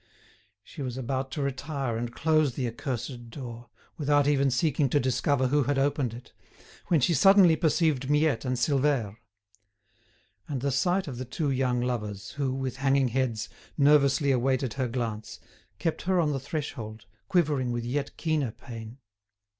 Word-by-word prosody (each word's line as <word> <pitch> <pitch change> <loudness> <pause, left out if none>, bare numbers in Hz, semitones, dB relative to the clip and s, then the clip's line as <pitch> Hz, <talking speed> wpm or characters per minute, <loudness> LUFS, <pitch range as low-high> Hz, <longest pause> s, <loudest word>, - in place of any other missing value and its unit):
She 150 - -10
was 130 -2 -4
about 130 +1 -2
to 145 - -2
retire 140 -2 -3
and 120 +1 -3
close 155 0 +2
the 125 - -1
accursed 120 0 -5
door, 120 -1 -8 0.3
without 145 -1 +3
even 140 -1 +3
seeking 140 +2 +1
to 145 - +3
discover 130 +1 +1
who 145 0 +2
had 145 0 0
opened 135 -4 0
it, 125 - -13 0.5
when 165 - +3
she 155 +6 +2
suddenly 185 +2 +6
perceived 155 -4 +1
Miette 150 -5 +2
and 130 -1 -1
Silvère. 130 -4 +1 1.3
And 135 -4 -3
the 140 +1 0
sight 180 +7 +1
of 125 -4 -6
the 130 - -4
two 140 +3 -2
young 125 -2 +1
lovers, 105 -5 -3
who, 140 -2 -2
with 130 -1 -3
hanging 135 -1 +2
heads, 115 -4 -1 0.3
nervously 140 -1 +4
awaited 130 -1 +1
her 130 -2 -1
glance, 115 -3 -4 0.4
kept 165 - -2
her 185 0 +1
on 155 -3 +2
the 135 - -1
threshold, 120 -7 -5 0.2
quivering 145 -8 +1
with 120 -1 -3
yet 140 +3 -3
keener 155 -6 0
pain. 115 0 -9
135 Hz, 160 wpm, -27 LUFS, 120-145 Hz, 1.3 s, suddenly